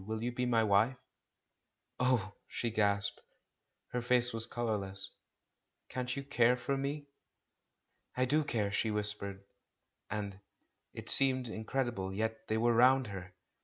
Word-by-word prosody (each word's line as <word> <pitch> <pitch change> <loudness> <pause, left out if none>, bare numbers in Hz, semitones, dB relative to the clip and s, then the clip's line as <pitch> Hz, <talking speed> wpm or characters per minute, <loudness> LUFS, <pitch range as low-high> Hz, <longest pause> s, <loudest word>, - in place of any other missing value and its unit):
Will 110 0 -3
you 120 - -1
be 125 +1 -1
my 115 -2 +3
wife?" 110 +5 +3 1.0
"Oh!" 125 -6 +2
she 120 - -3
gasped. 100 -1 +1 0.7
Her 125 - -2
face 125 0 +3
was 115 0 +3
colourless. 100 -5 -3 0.8
"Can't 125 -1 -3
you 140 - -4
care 125 -3 +3
for 140 +2 -1
me?" 140 +2 -3 1.1
"I 130 - +3
do 150 +4 +2
care," 110 -8 -1
she 110 +2 0
whispered, 105 -2 -2 0.7
and 100 -2 -4 0.3
— - - -50
It - - -7
seemed 130 -2 +4
incredible, 110 -3 -2
yet 110 +2 -3
they 110 - 0
were 120 +1 +3
round 130 +3 +5
her 95 0 -8
115 Hz, 140 wpm, -33 LUFS, 105-125 Hz, 1.1 s, round